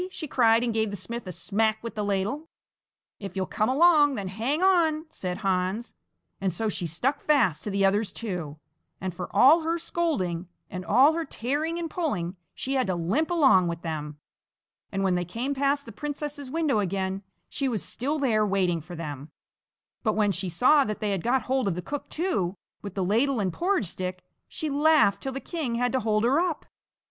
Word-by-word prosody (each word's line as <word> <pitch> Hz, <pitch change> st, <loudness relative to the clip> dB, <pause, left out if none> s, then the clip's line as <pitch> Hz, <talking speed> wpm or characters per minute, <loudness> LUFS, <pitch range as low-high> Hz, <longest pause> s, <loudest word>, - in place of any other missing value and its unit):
she 360 Hz, -3 st, -6 dB
cried, 230 Hz, -3 st, +4 dB
and 235 Hz, -2 st, 0 dB
gave 220 Hz, -1 st, +1 dB
the 200 Hz, -, -5 dB
smith 235 Hz, +2 st, -6 dB
a -, -, -4 dB
smack 215 Hz, +5 st, 0 dB
with 230 Hz, -, -5 dB
the 210 Hz, -1 st, -2 dB
ladle. 205 Hz, +11 st, -2 dB, 0.7 s
"If 195 Hz, -2 st, -7 dB
you'll 190 Hz, -1 st, 0 dB
come 215 Hz, +4 st, 0 dB
along, 295 Hz, 0 st, +5 dB
then 200 Hz, -4 st, -4 dB
hang 245 Hz, -, -1 dB
on!" 330 Hz, -5 st, +3 dB
said 180 Hz, -1 st, -4 dB
Hans, 195 Hz, +2 st, -1 dB, 0.5 s
and 195 Hz, -1 st, +1 dB
so 215 Hz, +6 st, -2 dB
she 180 Hz, -4 st, -3 dB
stuck 250 Hz, -, -1 dB
fast 230 Hz, -, +2 dB
to -, -, -3 dB
the 195 Hz, 0 st, +2 dB
others 200 Hz, +1 st, +2 dB
too, 180 Hz, -10 st, -5 dB, 0.4 s
and 185 Hz, -1 st, -4 dB
for 180 Hz, +1 st, -6 dB
all 275 Hz, +11 st, +6 dB
her 330 Hz, +1 st, 0 dB
scolding 195 Hz, -, -1 dB, 0.2 s
and 180 Hz, 0 st, -5 dB
all 255 Hz, -, +5 dB
her 330 Hz, +1 st, -1 dB
tearing 305 Hz, +5 st, -2 dB
and 340 Hz, -1 st, -2 dB
pulling, 210 Hz, -, -2 dB, 0.2 s
she 270 Hz, -, -3 dB
had 260 Hz, -5 st, +1 dB
to 185 Hz, -, 0 dB
limp 200 Hz, -, 0 dB
along 270 Hz, -, +5 dB
with 170 Hz, -1 st, -4 dB
them. 150 Hz, -3 st, -4 dB, 0.7 s
And 195 Hz, -, -1 dB
when 190 Hz, -1 st, +2 dB
they 180 Hz, 0 st, 0 dB
came 235 Hz, -, -3 dB
past 280 Hz, +1 st, +1 dB
the 230 Hz, -, -9 dB
princess's 290 Hz, +2 st, -5 dB
window 305 Hz, -6 st, +1 dB
again, 190 Hz, 0 st, -1 dB, 0.3 s
she 275 Hz, -2 st, -2 dB
was 220 Hz, -5 st, -2 dB
still 285 Hz, +5 st, -2 dB
there 235 Hz, -7 st, +2 dB
waiting 185 Hz, -5 st, +1 dB
for 175 Hz, +4 st, -9 dB
them, 150 Hz, -3 st, -6 dB, 0.7 s
but 215 Hz, -3 st, +1 dB
when 210 Hz, -1 st, +3 dB
she 185 Hz, 0 st, -3 dB
saw 255 Hz, -, +5 dB
that 215 Hz, -5 st, -4 dB
they 210 Hz, -1 st, -1 dB
had 195 Hz, -3 st, -1 dB
got 250 Hz, +3 st, +1 dB
hold 260 Hz, -2 st, 0 dB
of 185 Hz, -, 0 dB
the 180 Hz, -, -3 dB
cook 290 Hz, -1 st, -5 dB
too, 205 Hz, -, -1 dB, 0.2 s
with 200 Hz, -2 st, -7 dB
the 190 Hz, -2 st, 0 dB
ladle 240 Hz, +6 st, +2 dB
and 190 Hz, -4 st, -1 dB
porridge 370 Hz, -, +1 dB
stick, 185 Hz, 0 st, -5 dB, 0.2 s
she 315 Hz, -, -4 dB
laughed 295 Hz, -6 st, +4 dB
till 270 Hz, -, -3 dB
the 270 Hz, -, -4 dB
king 290 Hz, -7 st, -3 dB
had 245 Hz, 0 st, +1 dB
to 260 Hz, -, +1 dB
hold 215 Hz, -2 st, +1 dB
her 265 Hz, +6 st, +3 dB
up. 345 Hz, -3 st, -1 dB
220 Hz, 205 wpm, -26 LUFS, 190-285 Hz, 0.7 s, all